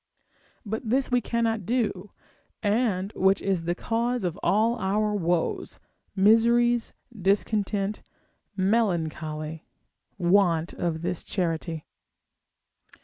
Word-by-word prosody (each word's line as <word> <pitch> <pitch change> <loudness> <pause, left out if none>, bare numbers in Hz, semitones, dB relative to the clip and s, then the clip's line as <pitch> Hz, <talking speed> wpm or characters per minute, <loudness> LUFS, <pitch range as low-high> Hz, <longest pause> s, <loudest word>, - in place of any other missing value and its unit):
But 220 +2 -4
this 260 +2 +1
we 245 0 +3
cannot 225 -2 -1
do; 210 -3 -1 0.5
and 205 -2 +1
which 190 +1 +3
is 190 -4 -1
the 175 +1 0
cause 235 +3 -1
of 175 -3 -2
all 220 +6 +2
our 210 +2 0
woes, 175 -4 -1 0.4
miseries, 235 +4 +4 0.2
discontent, 200 +1 0 0.6
melancholy, 160 -6 -1 0.5
want 175 -3 +2
of 165 -2 -3
this 180 -1 -2
charity. 165 -3 -3
200 Hz, 95 wpm, -26 LUFS, 175-225 Hz, 0.6 s, miseries